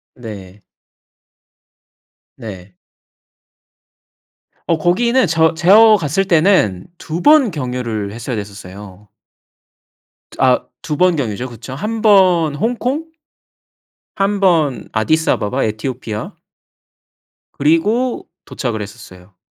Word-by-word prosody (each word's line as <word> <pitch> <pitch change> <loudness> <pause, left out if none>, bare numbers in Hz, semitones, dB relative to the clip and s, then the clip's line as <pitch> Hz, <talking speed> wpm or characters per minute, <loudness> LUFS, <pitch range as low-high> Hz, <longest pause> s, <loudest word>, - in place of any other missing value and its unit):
네. 105 -4 -10 1.8
네. 95 -6 -10 2.0
어 165 - +2
거기는 235 +10 +2
저 160 0 +2
제어 210 +6 +6
갔을 175 +2 -1
때는 160 - +2
2 165 +2 -5
번 295 -8 +5
경유를 125 -7 -4
했어야 120 +3 -5
됐었어요. 100 -1 -10 1.2
저 - - -14
아 130 -1 +3 0.2
2 150 - -3
번 180 0 +3
경유죠. 125 -1 -3
그쵸. 120 +2 -10
1 215 +8 -4
번 180 -8 +4
홍콩 250 - -2 1.0
1 200 0 0
번 160 - +1
아디스아바바 130 -1 0
에티오피아. 110 0 -5 1.2
그리고 205 - 0 0.2
도착을 115 -5 -4
했었어요. 95 -2 -12
145 Hz, 175 characters per minute, -17 LUFS, -, 2.0 s, 제어